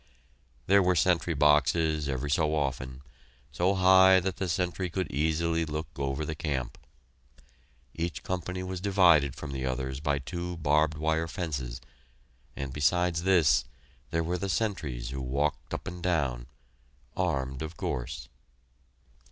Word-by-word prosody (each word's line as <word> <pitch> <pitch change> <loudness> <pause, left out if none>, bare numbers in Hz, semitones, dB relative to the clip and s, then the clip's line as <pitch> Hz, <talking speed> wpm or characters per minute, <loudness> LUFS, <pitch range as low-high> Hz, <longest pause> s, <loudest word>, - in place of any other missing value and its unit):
There 100 +1 +5
were 90 -1 +3
sentry 85 +1 +2
boxes 75 +1 +3
ever 65 +1 -2
so 75 +2 +1
often, 65 -2 -3 0.5
so 90 +8 +1
high 95 0 +7
that 95 0 -3
the 95 - -2
sentry 90 +1 -1
could 95 +2 -3
easily 80 +3 +1
look 75 -1 -4
over 70 +2 -2
the 80 - -3
camp. 70 -5 -3 1.1
Each 85 0 -4
company 90 0 -3
was 90 -1 -5
divided 85 -9 +4
from 75 - -7
the 65 -1 -4
others 65 +1 -3
by 70 -1 0
two 85 +7 -5
barbed 75 0 +2
wire 80 +1 0
fences, 65 -9 -4 0.8
and 70 -1 -5
besides 85 +3 +1
this 85 -7 +4 0.4
there 80 0 0
were 90 +2 -2
the 100 - -3
sentries 75 - -2
who 65 0 -4
walked 70 +2 -2
up - - -5
and 90 0 -6
down, 70 -9 -1 0.7
armed, 65 -1 -1
of 80 +1 -6
course. 65 0 -4
80 Hz, 140 wpm, -29 LUFS, 70-90 Hz, 1.1 s, high